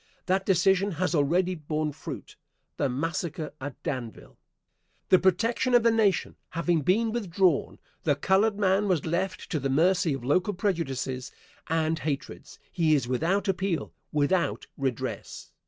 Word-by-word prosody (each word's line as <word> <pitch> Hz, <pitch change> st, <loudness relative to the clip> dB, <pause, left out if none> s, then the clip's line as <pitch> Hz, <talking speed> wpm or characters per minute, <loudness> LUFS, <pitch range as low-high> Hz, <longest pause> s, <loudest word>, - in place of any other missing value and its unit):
That 190 Hz, +1 st, 0 dB
decision 195 Hz, +1 st, +3 dB
has 180 Hz, +3 st, -1 dB
already 175 Hz, +5 st, +2 dB
borne 155 Hz, -1 st, -2 dB
fruit 145 Hz, -, -8 dB, 0.4 s
the 140 Hz, -, +1 dB
massacre 165 Hz, +4 st, -3 dB
at 145 Hz, 0 st, -7 dB
Danville. 120 Hz, -5 st, -5 dB, 0.7 s
The 185 Hz, -, +6 dB
protection 230 Hz, +7 st, +2 dB
of 240 Hz, -, +5 dB
the 230 Hz, -, +5 dB
Nation 215 Hz, -5 st, +1 dB
having 170 Hz, -1 st, 0 dB
been 220 Hz, +9 st, +2 dB
withdrawn, 190 Hz, -7 st, +1 dB, 0.2 s
the 145 Hz, -3 st, +2 dB
colored 200 Hz, +7 st, +2 dB
man 200 Hz, 0 st, +2 dB
was 180 Hz, -6 st, +1 dB
left 180 Hz, +4 st, -2 dB
to 155 Hz, -, 0 dB
the 135 Hz, 0 st, -2 dB
mercy 170 Hz, +3 st, +3 dB
of 135 Hz, -, -8 dB
local 180 Hz, -, +1 dB
prejudices 135 Hz, -, -2 dB, 0.4 s
and 160 Hz, 0 st, 0 dB
hatreds. 145 Hz, -3 st, -5 dB
He 160 Hz, -4 st, +3 dB
is 130 Hz, -5 st, 0 dB
without 165 Hz, +12 st, 0 dB
appeal, 190 Hz, -3 st, -1 dB, 0.2 s
without 150 Hz, +4 st, +1 dB
redress. 130 Hz, -4 st, -4 dB
170 Hz, 140 wpm, -27 LUFS, 150-190 Hz, 0.7 s, The